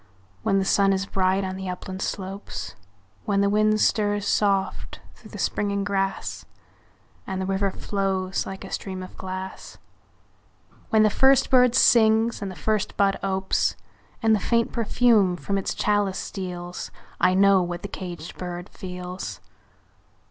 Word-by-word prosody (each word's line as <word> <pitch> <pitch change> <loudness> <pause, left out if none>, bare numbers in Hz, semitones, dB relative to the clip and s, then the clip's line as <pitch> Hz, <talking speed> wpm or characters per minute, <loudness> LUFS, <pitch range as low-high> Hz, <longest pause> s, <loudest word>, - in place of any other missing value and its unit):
When 195 - +2
the 195 - +1
sun 195 0 +3
is 190 0 -1
bright 190 0 +1
on 190 0 -3
the 190 -1 -5
upland 185 +1 -6
slopes; 195 +1 -5 0.5
When 200 -1 +2
the 200 0 +2
wind 215 +1 +3
stirs 205 -2 +1
soft 195 -2 0
through - - -16
the - - -9
springing 200 -1 -1
grass, 195 -1 -2 0.8
And 190 -1 -3
the 190 - -2
river 195 +1 0
flows 190 -1 -2
like 190 0 -7
a - - -10
stream 190 -1 -4
of 185 - -11
glass; 185 0 -7 1.1
When 220 -1 +4
the 215 - +4
first 265 +2 +4
bird 250 -2 +5
sings 225 0 +4
and 200 - -3
the 185 - -8
first 210 +7 -1
bud 195 -1 +2
opes, 190 0 0 0.5
And 225 0 +5
the - - 0
faint 230 +2 +1
perfume 225 -5 +3
from 195 +3 -3
its 195 - -1
chalice 205 -2 +1
steals 180 -2 -5 0.3
I 185 +1 +4
know 195 0 +5
what 175 0 -4
the - - -3
caged 175 -4 -8
bird 175 +1 -6
feels! 180 -1 -7
195 Hz, 155 wpm, -24 LUFS, 185-205 Hz, 1.1 s, bird